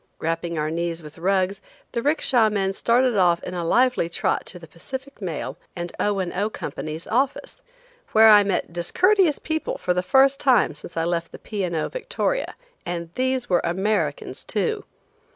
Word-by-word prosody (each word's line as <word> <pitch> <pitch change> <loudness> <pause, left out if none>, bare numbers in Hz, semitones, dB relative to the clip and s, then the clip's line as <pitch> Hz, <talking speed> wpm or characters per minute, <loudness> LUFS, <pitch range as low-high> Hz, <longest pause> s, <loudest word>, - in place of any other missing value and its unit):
Wrapping 165 +1 -2
our 155 0 -1
knees 170 0 -3
with 150 +1 -12
rugs 190 +2 +1 0.3
the 235 - -2
'ricksha 255 -5 +3
men 195 -2 0
started 240 +3 +2
off 175 -3 +3
in 180 - -5
a 175 -1 -3
lively 245 0 +2
trot 170 - -1
to 180 - -7
the 170 - -11
Pacific 265 - -9
Mail 160 -4 -4 0.2
and 175 -1 -4
O. 205 -1 +1
and 185 -2 -2
O. 205 +3 0
Companies' 155 -6 -6
office, 260 +4 -1 0.5
where 220 0 +7
I 210 -1 +9
met 195 -4 -2
discourteous 360 - +3
people 315 0 -3
for 180 - 0
the 180 - 0
first 270 +7 +4
time 255 - +3
since 160 +3 -11
I 165 - +1
left 170 0 -2
the - - -9
P. 210 -3 -4
& 175 - -4
O. 155 - 0
"Victoria." - - -2 0.3
And 170 -1 -5
these 255 -1 0
were 175 -2 +2
Americans, 190 +5 -1
too. 440 -3 -1
195 Hz, 180 wpm, -23 LUFS, 170-255 Hz, 0.5 s, I